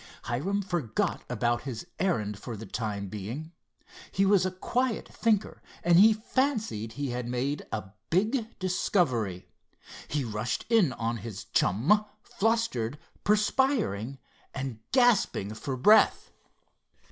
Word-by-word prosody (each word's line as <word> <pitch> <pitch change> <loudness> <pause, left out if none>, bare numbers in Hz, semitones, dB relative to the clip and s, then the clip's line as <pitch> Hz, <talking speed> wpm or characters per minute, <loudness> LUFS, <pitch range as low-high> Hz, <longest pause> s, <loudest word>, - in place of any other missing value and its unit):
Hiram 185 +13 -1
forgot 170 - -1
about 120 0 0
his 130 0 -6
errand 105 - 0
for 115 -1 -6
the 110 - -8
time 100 -1 -3
being. 110 - -6 0.6
He 195 - +2
was 195 -2 +4
a - - -3
quiet 240 +6 -1
thinker, 215 -3 0 0.2
and 175 0 +6
he 215 +3 +8
fancied 220 - -1
he 140 -1 -3
had 120 0 -3
made 130 +4 -2
a 95 -3 -4 0.2
big 220 +6 0
discovery. 130 - 0 0.6
He 145 -2 -1
rushed 110 +1 -3
in 215 - +5
on 115 +1 -2
his 110 -2 -7
chum, 145 - +2 0.2
flustered, 195 - 0 0.3
perspiring 210 - +1 0.4
and 135 -4 -4
gasping 240 - +3
for 130 +4 -4
breath. 210 - +5
140 Hz, 125 wpm, -28 LUFS, -, 0.6 s, he